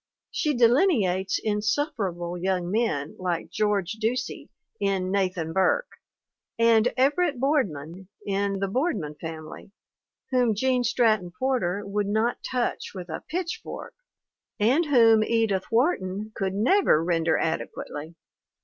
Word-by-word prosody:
She 300 -4 0
delineates 230 - +3
insufferable 210 - -1
young 180 0 -1
men 195 -10 -1
like 180 -2 -2
George 210 -2 0
Ducey 235 +2 -2 0.3
in 195 -2 0
Nathan 185 -5 -1
Burke 190 - +2 0.7
and 230 0 +4
Everett 285 +2 +2
Boardman 190 - -1 0.2
in 200 0 0
The 195 0 -1
Boardman 225 - -1
Family 160 +2 -8 0.6
whom 245 -4 +2
Gene 255 +3 +1
Stratton 220 -6 +2
Porter 205 -7 0
would 200 0 -1
not 220 +4 0
touch 245 -4 -2
with 180 -2 -7
a 160 - -5
pitch 360 +5 -3
fork - - -8 0.7
and 255 +11 +3
whom 225 -5 +5
Edith 220 -4 +1
Wharton 215 - 0
could 190 -2 -2
never 225 - +3
render 165 -1 +1
adequately. 160 0 -4
210 Hz, 120 wpm, -26 LUFS, 185-245 Hz, 0.7 s, whom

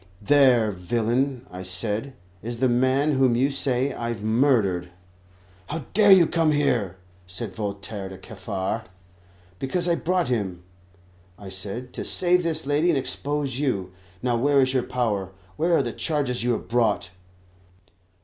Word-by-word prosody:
"There, 125 -3 +4
villain," 120 +7 -1
I 90 +1 -7
said, 105 +7 -2 0.3
"is 115 +2 -5
the 130 - +3
man 130 +4 +2
whom 130 -3 +3
you 135 +4 +2
say 135 0 +1
I've 115 -3 -4
murdered." 110 -7 +2 0.8
"How 160 +2 -5
dare 205 0 +6
you 185 -3 +8
come 160 -2 +2
here?" 115 -11 0 0.3
said 95 +3 -5
Voltaire 100 0 -5
to 95 - -9
Kaffar. 95 +1 -4 0.7
"Because 170 +7 0
I 170 - +3
brought 175 -1 0
him," 95 -7 -2 0.7
I 100 -2 -10
said, 100 +6 -5
"to - - -4
save 180 0 +3
this 160 -3 -1
lady 145 +4 +2
and 160 - +3
expose 135 +1 -2
you. 100 -11 -1 0.3
Now, 125 -1 +1
where 140 +3 +3
is 130 -1 +2
your 130 - +2
power, 115 -6 -1
and 95 - -16 0.3
where 170 +1 +3
are - - +2
the 120 -3 -4
charges 140 -6 -1
you 120 0 +2
have - - -4
brought?" 110 -5 +1
125 Hz, 155 wpm, -24 LUFS, 105-140 Hz, 0.8 s, you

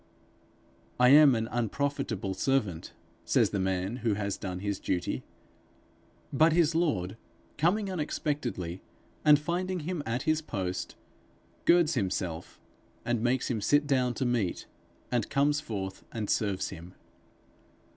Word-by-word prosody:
'I 125 0 +6
am 145 -2 +8
an 115 0 -1
unprofitable 120 -4 -2
servant,' 105 -6 -1 0.3
says - - +2
the 100 - -1
man 95 +4 -1
who 115 -4 0
has 100 -1 -2
done 90 -2 -5
his 100 -1 -2
duty; 90 -1 -2 1.1
but 155 +4 +5
his 165 -1 +3
lord, 125 - 0 0.4
coming 195 +6 +2
unexpectedly, 145 - -3 0.4
and 150 -1 +7
finding 180 +4 -2
him 170 +1 -3
at 115 +1 -2
his 155 0 +1
post, 95 -10 -4 0.7
girds 170 -2 +5
himself, 90 - -3 0.5
and 120 -2 0
makes 125 +2 +1
him 110 -3 -2
sit 145 +7 +3
down 130 -4 +1
to 130 - -1
meat, 115 -7 -1 0.5
and 120 -3 0
comes 145 +2 +2
forth 95 -7 -5
and 110 -3 -3
serves 100 -3 0
him. 85 +3 -10
120 Hz, 130 wpm, -29 LUFS, 95-150 Hz, 1.1 s, am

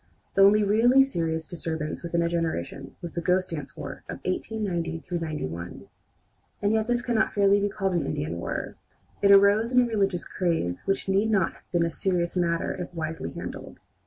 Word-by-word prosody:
The 195 - +3
only 205 +2 +6
really 235 +6 +5
serious 165 - -2
disturbance 160 -3 -4
within 170 0 0
a - - +1
generation 160 - -3
was 170 - -6
the 170 - -2
"Ghost 185 +2 +1
dance 150 -4 -6
war" 140 -1 -7
of - - -4
1890 180 -4 -2
91. 150 - -4 0.7
And 205 +1 +1
yet 220 0 +1
this 240 0 +1
cannot 230 -3 +1
fairly 200 0 +4
be 205 - +1
called 195 -1 -1
an 175 - 0
Indian 80 +1 -3
war. - - -4 0.4
It 200 - +4
arose 200 +4 +6
in 250 - +5
a 250 - +5
religious 200 -6 0
craze 165 - -1
which 195 0 0
need 195 +3 +2
not 195 -6 +2
have - - -23
been 170 -1 +2
a 165 - -2
serious 175 -1 0
matter 170 -2 0
if 180 -1 -6
wisely 160 0 -4
handled. - - -7
180 Hz, 185 wpm, -26 LUFS, 165-205 Hz, 0.7 s, only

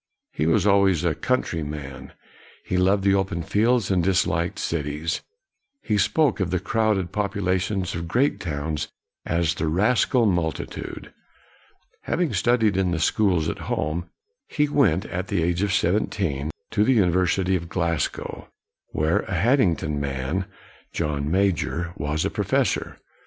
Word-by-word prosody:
He 75 - -1
was 90 +4 +3
always 100 -4 +4
a 85 - +2
country 85 - -1
man; 70 -3 -7 0.5
he - - -2
loved 95 +2 +3
the 100 0 +4
open 95 -3 0
fields 110 +4 +2
and 90 -3 +2
disliked 85 -2 +1
cities. 75 +1 -2 0.6
He 105 -1 +1
spoke 140 +5 +2
of 95 -3 0
the 90 - 0
crowded 100 -1 0
popula 100 -3 0
tions 95 -1 -2
of 85 0 -4
great 125 - +1
towns 75 -2 -3 0.4
as 85 -1 +1
the 80 -1 -2
rascal 115 - +2
multi 85 -5 0
tude. - - -8 0.9
Having 175 -3 0
studied 110 -5 +2
in 95 -2 +2
the 85 - -1
schools 90 -2 +2
at - - -3
home, 85 +3 -2 0.4
he 150 0 +1
went, 110 - +2
at 90 -1 -4
the 85 - 0
age 85 +1 0
of 100 -1 +1
seventeen, 85 -6 0 0.2
to 105 -2 +2
the 130 - +4
University 95 -2 +2
of 85 -2 -4
Glasgow, 85 -3 -2 0.4
where 80 +2 +1
a 95 - -4
Hadding 105 - +3
ton 75 -2 -3
man, 70 +6 -2 0.5
John 75 -1 -2
Major, 85 -2 0
was 75 +2 -2
a - - -1
professor. - - 0
90 Hz, 150 wpm, -24 LUFS, 80-100 Hz, 0.9 s, always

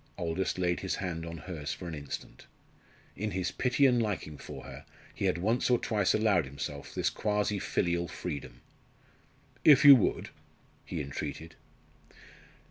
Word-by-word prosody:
Aldous 90 +1 -2
laid 90 -1 0
his 95 - -2
hand 85 -3 -4
on 85 0 -6
hers 75 -2 -5
for 90 - -8
an 85 - -5
instant. 70 -3 -8 0.7
In 105 +2 -2
his 90 -2 -2
pity 130 +2 +2
and 125 -3 +4
liking 100 -8 -3
for - - -9
her - - -10 0.3
he - - -3
had 90 -2 +2
once 110 +9 +1
or 125 - +5
twice 105 -5 +1
allowed 105 -7 +3
himself 70 +1 -6
this - - +1
quasi 105 -1 0
filial 85 -1 0
freedom. 75 -9 -6 1.0
"If 145 -1 +7
you 140 -1 +12
would," 115 - 0 0.6
he - - -4
entreated. 75 +3 -6
90 Hz, 150 wpm, -30 LUFS, 80-105 Hz, 1.0 s, you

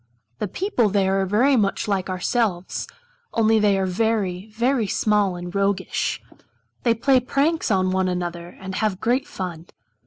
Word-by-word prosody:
The - - -1
people 250 - 0
there 195 -1 +2
are 225 +8 +3
much 200 0 0
like 195 -2 -1
ourselves, 185 0 -1 0.5
only 225 -1 +4
they 205 -2 +3
are 190 - +1
very, 195 -1 -1
very 235 +1 +1
small 205 -2 +1
and 175 0 -7
roguish. 200 -1 0 0.6
They 235 -2 +2
play 260 +3 +3
pranks 280 +6 0
on 185 -3 +2
one 190 0 +1
another 175 -1 -3
and 190 0 -6
have 200 -1 -1
great 255 +5 +1
fun. 175 -3 -6
200 Hz, 150 wpm, -23 LUFS, 185-230 Hz, 0.6 s, only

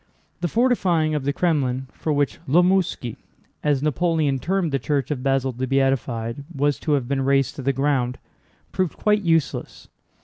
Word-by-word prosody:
The 175 - 0
fortifying 180 -9 +2
of 145 -3 -2
the 140 - +2
Krémlin, 140 -6 0
for 155 - -3
which 140 -6 0
la 165 +7 +5
Mosquée 180 - 0 0.5
(as 145 -2 +1
Napoleon 155 -3 +1
termed 180 +3 0
the 135 - 0
church 140 +2 -1
of 135 -4 -2
Basil 135 0 +1
the 130 +2 -4
Beatified) 130 -2 0
was 145 +1 +1
to 155 - 0
have 135 -4 0
been 135 0 0
razed 135 0 +2
to - - -4
the 135 +1 +1
ground, 135 -2 0 0.5
proved 185 -3 -1
quite 210 0 +2
useless. 165 -4 -1
140 Hz, 170 wpm, -23 LUFS, 135-165 Hz, 0.5 s, la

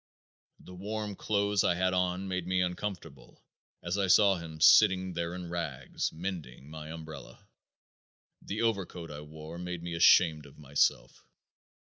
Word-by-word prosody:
The 90 - -14
warm 105 +2 -5
clothes 100 0 +1
I 85 - +2
had 95 +1 +1
on 90 +1 0
made 90 -2 -3
me 95 0 +1
uncomfortable 90 -5 -5 0.4
as 85 +4 -2
I 95 - +1
saw 100 +1 +5
him 80 -2 -9
sitting 95 +3 +5
there 85 +1 -3
in 90 -1 -6
rags 85 -6 -3
mending 80 -6 -7
my 80 -1 -8
umbrella. 80 -1 -10 0.9
The 110 +4 -3
overcoat 95 -7 -2
I 75 0 -7
wore 80 +2 -10
made 90 -1 -5
me 85 0 -5
ashamed 80 -3 +5
of 70 - -18
myself. 70 -1 0
90 Hz, 145 wpm, -30 LUFS, 80-95 Hz, 0.9 s, saw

